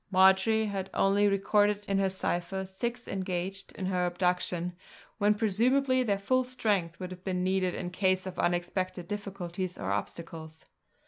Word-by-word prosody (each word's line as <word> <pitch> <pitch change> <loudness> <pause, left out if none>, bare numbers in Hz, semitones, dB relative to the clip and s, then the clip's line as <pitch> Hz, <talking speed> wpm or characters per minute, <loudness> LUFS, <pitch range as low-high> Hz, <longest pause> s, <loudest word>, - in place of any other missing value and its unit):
Marjory 190 +3 +5
had 195 -2 -3
only 200 +1 +4
recorded 205 +1 +2
in 195 0 +1
her 195 -1 +2
cipher 190 0 -2
six 235 +6 -4
engaged 190 0 -3
in 190 - -4
her 180 -1 +1
abduction, 180 -1 0 0.5
when 210 0 +4
presumably 255 +5 +2
their 205 -5 +1
full 255 +6 +2
strength 210 -9 -1
would 185 0 -5
have 180 0 -9
been 185 -2 -1
needed 185 -1 +1
in 175 -1 -4
case 185 0 +1
of 185 - -6
unexpected 175 0 -1
difficulties 190 -3 -4
or 95 0 -3
obstacles. 160 +8 -5
190 Hz, 150 wpm, -30 LUFS, 180-205 Hz, 0.5 s, Marjory